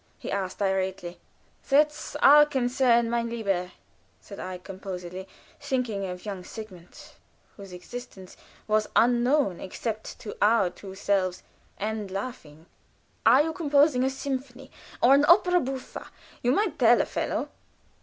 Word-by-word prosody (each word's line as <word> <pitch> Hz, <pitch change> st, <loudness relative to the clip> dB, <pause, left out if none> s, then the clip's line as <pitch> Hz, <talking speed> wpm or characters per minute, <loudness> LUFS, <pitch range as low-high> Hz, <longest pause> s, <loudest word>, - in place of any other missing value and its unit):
he -, -, -7 dB
asked, 190 Hz, -2 st, -3 dB
irately. 190 Hz, -2 st, -2 dB, 0.5 s
"That's 300 Hz, +2 st, +2 dB
our 295 Hz, +1 st, +8 dB
concern, 245 Hz, -3 st, +2 dB
mein 235 Hz, 0 st, -1 dB
lieber," 195 Hz, -6 st, -2 dB, 0.5 s
said 200 Hz, -, -12 dB
I, 185 Hz, 0 st, -5 dB
composedly, 185 Hz, -1 st, -8 dB, 0.3 s
thinking 225 Hz, -7 st, -2 dB
of 180 Hz, +1 st, -8 dB
young 195 Hz, -3 st, -5 dB
Sigmund, 185 Hz, -5 st, -11 dB, 0.4 s
whose 200 Hz, -2 st, -11 dB
existence 190 Hz, +1 st, -10 dB, 0.3 s
was 215 Hz, 0 st, +1 dB
unknown 245 Hz, -, +3 dB
except 220 Hz, +3 st, -5 dB
to 210 Hz, -, -7 dB
our 210 Hz, -3 st, +3 dB
two 190 Hz, +1 st, -11 dB
selves, 190 Hz, -2 st, -1 dB, 0.3 s
and 215 Hz, -1 st, -3 dB
laughing. 185 Hz, -7 st, -7 dB, 0.6 s
"Are 255 Hz, +6 st, +7 dB
you 320 Hz, +1 st, -3 dB
composing 290 Hz, -4 st, +3 dB
a 265 Hz, -, +2 dB
symphony? 265 Hz, -1 st, -6 dB, 0.3 s
or 255 Hz, -, +7 dB
an 280 Hz, +1 st, +5 dB
opera 360 Hz, +1 st, +5 dB
buffa? 265 Hz, -3 st, -6 dB, 0.3 s
You 245 Hz, -, +2 dB
might 365 Hz, +1 st, 0 dB
tell 240 Hz, -1 st, +6 dB
a -, -, +2 dB
fellow." -, -, -3 dB
225 Hz, 135 wpm, -26 LUFS, 190-265 Hz, 0.6 s, our